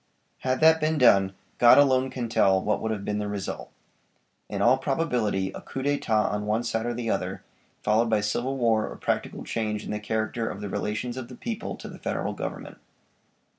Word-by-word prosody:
Had 130 +1 -1
that 160 0 +6
been 155 +1 +1
done 100 -7 +5 0.2
God 120 -1 +8
alone 130 -2 +4
can 125 -2 -4
tell 95 -4 +3
what 105 +3 -1
would 110 - -2
have 105 -2 -3
been 105 0 -1
the 105 - -2
result. 100 -2 -5 0.8
In 100 - -3
all 120 +6 +4
probability 125 -10 0
a - - -7
coup 135 - -6
d'etat 115 -7 +1
on 105 0 -3
one 110 +3 +1
side 115 -1 -1
or 120 - -2
the 115 -1 -2
other, - - -3 0.4
followed 110 +2 +3
by 110 -1 +3
civil 120 +6 -1
war 115 -3 +2
or - - -8
practical - - -2
change 110 -2 -2
in - - -5
the 105 - -2
character 110 +2 -2
of - - -6
the 105 -1 -5
relations 105 +5 -3
of 130 -2 -5
the 125 - -10
people 230 - -4
to - - -9
the - - -10
Federal - - -2
Government. - - -6
115 Hz, 205 wpm, -26 LUFS, 105-130 Hz, 0.8 s, God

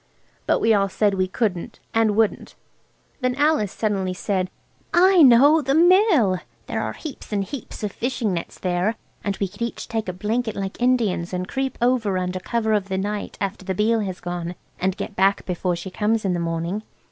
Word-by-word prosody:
But - - +3
we 225 - +4
all 195 -1 +2
said 205 +1 +1
we 185 -1 +1
couldn't 185 -3 -2
and 225 -2 +3
wouldn't. 220 -1 0 0.6
Then 255 -2 0
Alice 290 - +2
suddenly 195 -4 -1
said– 185 -1 -1 0.5
"I 370 0 +6
know! 285 +4 +7
The 275 0 0
Mill. 335 - +5 0.3
There - - -2
are - - -3
heaps 300 -7 -9
and 200 -2 0
heaps 245 +1 -8
of 210 - -1
fishing 235 -3 -2
nets 170 - -5
there, 180 +4 0 0.3
and 200 -1 -2
we 195 - -1
could 200 +5 -16
each 235 0 -3
take 220 -4 -2
a - - -3
blanket 220 +4 -2
like 195 +3 -5
Indians 220 -9 +1
and 180 0 -2
creep 265 0 -2
over 235 -6 +2
under 180 0 -2
cover 220 +2 -1
of 200 -2 0
the 190 - -1
night 205 +2 -3
after 195 -1 -3
the 190 0 -3
Beale 225 +3 +2
has 190 -4 -3
gone, 175 0 -4 0.2
and 190 +1 0
get 205 - -5
back 195 +1 +2
before 180 0 -1
she 175 +2 -7
comes 215 +2 0
in 185 - +1
the 175 - -1
morning." 170 +4 -2
205 Hz, 195 wpm, -23 LUFS, 185-235 Hz, 0.6 s, know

